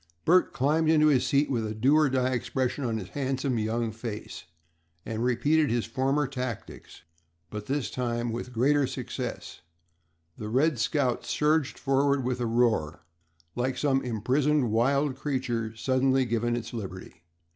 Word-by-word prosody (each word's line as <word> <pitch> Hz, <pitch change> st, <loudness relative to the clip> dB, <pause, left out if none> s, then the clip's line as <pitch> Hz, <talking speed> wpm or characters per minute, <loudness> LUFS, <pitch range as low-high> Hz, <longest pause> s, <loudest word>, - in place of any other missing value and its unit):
Bert 180 Hz, +3 st, +4 dB
climbed 155 Hz, +4 st, +1 dB
into 155 Hz, -1 st, +5 dB
his 135 Hz, -4 st, +2 dB
seat 145 Hz, 0 st, +2 dB
with 120 Hz, -4 st, -1 dB
a 110 Hz, 0 st, -4 dB
do 130 Hz, +7 st, +3 dB
or 155 Hz, -2 st, +4 dB
die 130 Hz, -1 st, +1 dB
expression 130 Hz, +2 st, -2 dB
on 115 Hz, -3 st, -1 dB
his 95 Hz, -4 st, -7 dB
handsome 135 Hz, -2 st, -1 dB
young 110 Hz, +1 st, -1 dB
face, 110 Hz, -3 st, -7 dB, 0.6 s
and 115 Hz, +1 st, -3 dB
repeated 145 Hz, +5 st, +2 dB
his 120 Hz, -1 st, 0 dB
former 135 Hz, +5 st, 0 dB
tactics, 125 Hz, -, -6 dB, 0.5 s
but 105 Hz, 0 st, -6 dB
this 140 Hz, -1 st, -1 dB
time 120 Hz, -1 st, -2 dB
with 120 Hz, +2 st, -5 dB
greater 135 Hz, +4 st, +2 dB
success. -, -, -6 dB, 0.8 s
The 105 Hz, -, -5 dB
"Red 135 Hz, +3 st, +2 dB
Scout" 125 Hz, 0 st, 0 dB
surged 150 Hz, +4 st, +1 dB
forward 140 Hz, 0 st, +1 dB
with 125 Hz, 0 st, -2 dB
a 120 Hz, -, 0 dB
roar, 110 Hz, -10 st, +1 dB, 0.5 s
like 125 Hz, +1 st, -1 dB
some 135 Hz, -2 st, +2 dB
imprisoned 130 Hz, +3 st, +1 dB
wild 135 Hz, +5 st, +2 dB
creature 125 Hz, -5 st, -2 dB
suddenly 130 Hz, +2 st, +2 dB
given 120 Hz, 0 st, 0 dB
its 115 Hz, 0 st, -5 dB
liberty. 95 Hz, -5 st, -7 dB
125 Hz, 150 wpm, -27 LUFS, 115-140 Hz, 0.8 s, into